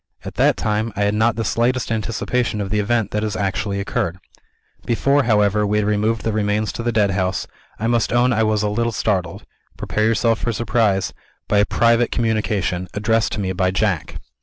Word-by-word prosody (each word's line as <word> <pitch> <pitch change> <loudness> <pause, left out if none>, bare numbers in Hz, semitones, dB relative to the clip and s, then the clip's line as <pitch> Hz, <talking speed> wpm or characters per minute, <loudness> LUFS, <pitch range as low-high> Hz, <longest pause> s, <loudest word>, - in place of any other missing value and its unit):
At - - -6
that - - +2
time, 110 +1 -1
I 100 - -2
had 100 0 +1
not 110 +1 +2
the 115 - -2
slightest 120 +3 0
anticipation 115 +1 -1
of 100 -1 -3
the 105 - +1
event 110 0 0
that 105 - -1
has 105 -1 -2
actually 100 0 -2
occurred. 90 -3 -2 0.7
Before, 140 +4 +2
however, 105 -2 +3
we 105 +1 +1
had 105 - +1
removed 105 +1 0
the 110 - 0
remains 105 0 0
to - - -5
the 120 +1 0
Deadhouse, 100 -4 0 0.3
I 110 - -3
must 115 -1 +1
own 120 +1 +3
I 110 - +1
was 110 -1 +1
a - - +1
little 115 +3 0
startled 95 -6 -2 0.3
prepare 110 - -1
yourself 115 0 +2
for - - -2
a - - 0
surprise 105 -4 +1 0.3
by 105 - +2
a 105 - +4
private 115 0 +2
communication, 105 -5 -1
addressed 110 +2 +1
to - - -3
me 95 -2 -2
by 90 0 +1
Jack." 95 -5 -1
105 Hz, 200 wpm, -20 LUFS, 100-115 Hz, 0.7 s, a